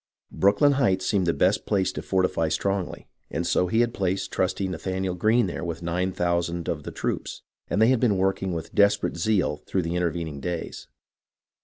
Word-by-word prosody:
Brooklyn 100 Hz, +9 st, +4 dB
Heights 95 Hz, -7 st, +2 dB
seemed 95 Hz, -3 st, +1 dB
to -, -, +4 dB
be -, -, -6 dB
the -, -, +4 dB
best 95 Hz, +3 st, 0 dB
place 95 Hz, -3 st, +1 dB
to -, -, -5 dB
fortify 90 Hz, -4 st, +1 dB
strongly, 100 Hz, +2 st, -2 dB, 0.2 s
and -, -, -2 dB
so 90 Hz, -, +2 dB
he 110 Hz, +6 st, +2 dB
had 120 Hz, 0 st, +1 dB
placed 95 Hz, 0 st, -1 dB
trusty 95 Hz, +1 st, 0 dB
Nathanael 95 Hz, +1 st, -3 dB
Greene 110 Hz, +6 st, +3 dB
there 90 Hz, -, -4 dB
with 85 Hz, -1 st, -4 dB
nine 90 Hz, +2 st, -1 dB
thousand 85 Hz, -1 st, -1 dB
of 75 Hz, -, -2 dB
the -, -, -7 dB
troops, -, -, -4 dB, 0.3 s
and -, -, 0 dB
they 110 Hz, +2 st, +5 dB
had 130 Hz, -2 st, +3 dB
been 110 Hz, -6 st, +2 dB
working 95 Hz, 0 st, 0 dB
with 85 Hz, -2 st, -5 dB
desperate 100 Hz, 0 st, +3 dB
zeal 90 Hz, -3 st, +1 dB
through 95 Hz, -, 0 dB
the 85 Hz, +1 st, -2 dB
intervening 85 Hz, -4 st, -2 dB
days. 85 Hz, +4 st, -5 dB
95 Hz, 195 wpm, -25 LUFS, 85-100 Hz, 0.3 s, they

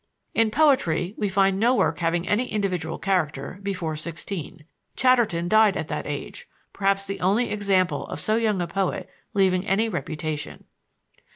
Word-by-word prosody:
In 225 Hz, -1 st, +3 dB
poetry 215 Hz, -, +2 dB
we 205 Hz, -2 st, -1 dB
find 195 Hz, 0 st, +2 dB
no 240 Hz, +4 st, +4 dB
work -, -, +1 dB
having 170 Hz, +1 st, 0 dB
any 235 Hz, +5 st, +1 dB
individual 180 Hz, -6 st, -2 dB
character 180 Hz, -4 st, -1 dB
before 185 Hz, -5 st, -3 dB
sixteen. 165 Hz, 0 st, -6 dB, 0.3 s
Chatterton 235 Hz, -10 st, +3 dB
died 215 Hz, 0 st, +4 dB
at 155 Hz, -, -4 dB
that 150 Hz, -, -3 dB
age, 145 Hz, -1 st, -6 dB, 0.3 s
perhaps 195 Hz, 0 st, +1 dB
the 195 Hz, 0 st, -5 dB
only 205 Hz, +7 st, +1 dB
example 195 Hz, -3 st, +1 dB
of -, -, -6 dB
so 215 Hz, -, +1 dB
young 220 Hz, -4 st, +1 dB
a -, -, -4 dB
poet 195 Hz, +2 st, -2 dB, 0.3 s
leaving 185 Hz, -2 st, +3 dB
any 210 Hz, +3 st, +1 dB
reputation. 155 Hz, -5 st, -4 dB
195 Hz, 155 wpm, -24 LUFS, 170-210 Hz, 0.3 s, no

